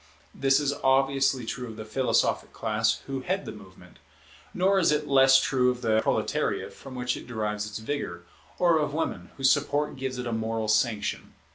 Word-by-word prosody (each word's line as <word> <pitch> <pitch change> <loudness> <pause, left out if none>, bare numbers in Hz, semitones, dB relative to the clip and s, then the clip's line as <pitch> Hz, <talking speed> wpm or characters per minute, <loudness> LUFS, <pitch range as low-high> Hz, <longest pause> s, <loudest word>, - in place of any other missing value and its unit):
This 135 0 +3
is 140 -1 0
obviously 135 -1 +2
true 125 +2 -5
of 110 - -9
the 110 - -7
philosophic 130 +4 0
class 110 0 0
who 135 -1 -4
head 190 +7 -2
the - - -5
movement; 95 -3 -15 0.5
nor 190 +2 +2
is 170 - +3
it 150 0 0
less 135 -1 +6
true 130 -1 +2
of 125 0 -3
the 110 -1 +3
proletariate, - - -1
from 135 -2 -11
whom 125 - -4
it 125 0 -3
derives 105 -3 -3
its 105 - -6
vigour, 110 -8 -4 0.3
or 170 -3 +3
of 150 -1 -2
women, 90 - -3
whose 135 -1 +4
support 145 0 0
gives 130 -1 -4
it 125 - -4
a 120 - -3
moral 110 0 -2
sanction. 110 -1 0
130 Hz, 185 wpm, -27 LUFS, 110-140 Hz, 0.5 s, less